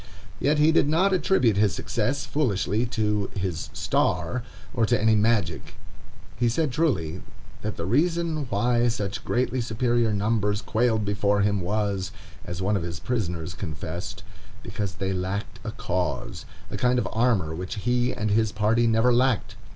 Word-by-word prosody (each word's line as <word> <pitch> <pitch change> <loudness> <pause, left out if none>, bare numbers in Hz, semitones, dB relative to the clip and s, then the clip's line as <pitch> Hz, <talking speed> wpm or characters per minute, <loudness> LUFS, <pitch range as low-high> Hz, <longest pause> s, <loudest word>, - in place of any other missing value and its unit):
Yet 145 +3 +2
he 150 +2 +5
did 155 -3 +3
not 185 +5 +3
attribute 145 - +3
his 105 -2 +3
success, 140 +3 -1
foolishly, 110 - 0
to 105 -4 0
"his 95 -4 -3
star," 90 +9 0 0.3
or 115 -4 +2
to 120 -1 +2
any 110 +1 +4
magic. 105 -7 +1 0.6
He 120 0 +2
said, 150 +4 0
truly, 95 - 0 0.4
that 105 0 -4
the 85 - -3
reason 160 - +1
why 120 +4 +2
such 100 -5 -2
greatly 125 +1 0
superior 120 0 +1
numbers 105 0 0
quailed 110 0 +1
before 100 0 +1
him 100 -1 +1
was, 100 0 -1 0.3
as 85 +1 -5
one 105 +2 +2
of 95 - 0
his 85 0 -5
prisoners 90 -10 -2
confessed, 80 0 -6 0.4
because 100 -1 -4
they 95 +2 -2
lacked 95 +3 -3
a - - -4
cause—a 90 -6 -4
kind 125 0 +2
of 125 - 0
armor 110 -9 +1
which 90 +5 -5
he 120 +4 +1
and 110 -4 -2
his 110 0 +2
party 110 +3 +2
never 115 +2 +4
lacked. 125 -2 +1
110 Hz, 155 wpm, -25 LUFS, 95-125 Hz, 0.6 s, he